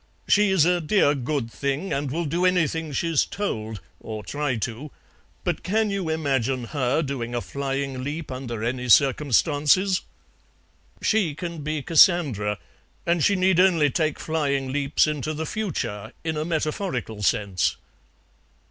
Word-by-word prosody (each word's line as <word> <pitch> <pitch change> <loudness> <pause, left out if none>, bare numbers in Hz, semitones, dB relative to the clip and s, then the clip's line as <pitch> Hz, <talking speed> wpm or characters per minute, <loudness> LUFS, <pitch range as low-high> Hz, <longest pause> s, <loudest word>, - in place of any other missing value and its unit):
She's 190 -6 +4
a 175 0 +2
dear 155 -2 +3
good 135 -3 -2
thing, 140 - -2
and 140 0 -1
will 165 +5 -2
do 170 +5 -1
anything 165 -3 +1
she's 165 +1 +1
told, 110 - -4 0.2
or 110 -1 -7
try 145 -3 -2
to; 120 +6 -4 0.5
but - - -1
can 215 +2 0
you 195 -4 -2
imagine 135 -5 0
her 135 +4 0
doing 120 -4 -4
a - - +1
flying 135 +4 -3
leap 150 +2 -5
under 120 -4 -5
any 125 +1 -2
circumstances?" 145 - +3 1.0
"She 195 -9 +2
can 170 -1 -5
be 150 -1 -3
Cassandra, 145 - +4 0.5
and 170 -2 +1
she 200 - +4
need 185 -1 +3
only 170 -6 +4
take 155 +2 0
flying 140 -4 -1
leaps 145 0 +2
into 155 0 -2
the 160 +1 -3
future, 135 - -4
in 160 -1 -2
a 155 0 -2
metaphorical 155 - -2
sense." 100 -4 +1
145 Hz, 140 wpm, -24 LUFS, 130-170 Hz, 1.0 s, She's